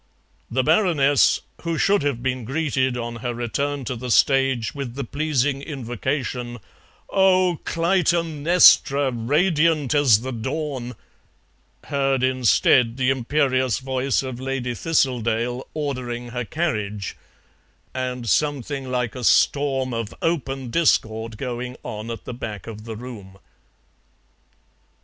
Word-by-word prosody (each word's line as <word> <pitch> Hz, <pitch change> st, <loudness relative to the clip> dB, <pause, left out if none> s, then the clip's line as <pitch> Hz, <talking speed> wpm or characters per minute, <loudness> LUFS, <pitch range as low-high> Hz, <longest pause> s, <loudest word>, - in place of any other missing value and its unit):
The 130 Hz, +2 st, 0 dB
Baroness, 155 Hz, -, +3 dB, 0.2 s
who 165 Hz, -1 st, -2 dB
should 200 Hz, +2 st, +3 dB
have 140 Hz, -5 st, -2 dB
been 130 Hz, -1 st, -1 dB
greeted 130 Hz, -1 st, 0 dB
on 120 Hz, 0 st, -4 dB
her 120 Hz, +1 st, -4 dB
return 140 Hz, +4 st, -2 dB
to 125 Hz, -, -3 dB
the 125 Hz, +2 st, -6 dB
stage 135 Hz, -2 st, +3 dB
with 135 Hz, -4 st, -6 dB
the 140 Hz, -, -3 dB
pleasing 145 Hz, 0 st, -1 dB
invocation, 125 Hz, -2 st, -4 dB, 0.5 s
"Oh, 185 Hz, -3 st, +3 dB
Clytemnestra, 165 Hz, -4 st, +3 dB
radiant 150 Hz, +4 st, +1 dB
as 135 Hz, -8 st, +5 dB
the 130 Hz, +2 st, -4 dB
dawn," 130 Hz, 0 st, -4 dB, 0.9 s
heard 135 Hz, -2 st, 0 dB
instead 125 Hz, -1 st, +3 dB
the 130 Hz, 0 st, +2 dB
imperious 130 Hz, -2 st, +1 dB
voice 130 Hz, 0 st, -1 dB
of 130 Hz, -2 st, -6 dB
Lady 130 Hz, -2 st, -3 dB
Thistledale 125 Hz, -5 st, 0 dB
ordering 125 Hz, -5 st, -4 dB
her 125 Hz, 0 st, -4 dB
carriage, 105 Hz, -, -3 dB, 0.8 s
and 125 Hz, -2 st, -4 dB
something 140 Hz, -1 st, 0 dB
like 125 Hz, -2 st, -1 dB
a 125 Hz, -, -7 dB
storm 135 Hz, 0 st, +2 dB
of 115 Hz, -2 st, -4 dB
open 135 Hz, -6 st, -2 dB
discord 110 Hz, -8 st, +1 dB
going 125 Hz, 0 st, -5 dB
on 110 Hz, +1 st, -6 dB
at 115 Hz, -, -6 dB
the -, -, -5 dB
back 105 Hz, -5 st, -6 dB
of 110 Hz, -1 st, -9 dB
the 115 Hz, -1 st, -6 dB
room. 105 Hz, -5 st, -10 dB
130 Hz, 120 wpm, -23 LUFS, 120-145 Hz, 0.9 s, as